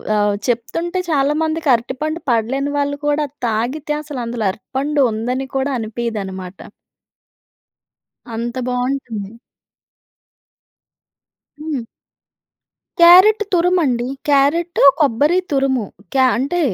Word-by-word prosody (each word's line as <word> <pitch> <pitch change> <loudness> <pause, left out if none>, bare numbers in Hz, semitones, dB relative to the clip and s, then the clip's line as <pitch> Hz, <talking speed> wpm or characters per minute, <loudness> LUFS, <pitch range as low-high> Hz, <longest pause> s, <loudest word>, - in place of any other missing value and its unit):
ఆహ్, 205 -1 +2
చెప్తుంటే 330 +10 -2
చాలా 285 -1 +2
మందికి 315 -1 -1
అరటిపండు 270 +7 -2
పడలేని 265 +5 0
వాళ్ళు 285 0 -1
కూడా 295 +1 +1 0.2
తాగితే 255 +7 -2
అసలు 285 -4 -6
అందులో 230 -2 -3
అరటిపండు 275 +6 -1
ఉందని 250 +5 -3
కూడా 270 +1 -1
అనిపీదన్నమాట. 205 -5 -5 1.8
అంత 235 +2 -4
బాగుంటుంది. 250 -5 -3 2.3
హ్మ్. 300 -6 -3 1.2
క్యారట్ 375 +5 +7
తురుమండీ. 335 -9 +2 0.2
క్యారెటు, 295 +5 +2 0.2
కొబ్బరి 295 +4 +2
తురుము. 270 -4 +1 0.3
క్యా 265 -1 +4
అంటే 285 +8 -1
270 Hz, 90 wpm, -18 LUFS, 235-300 Hz, 2.3 s, క్యారట్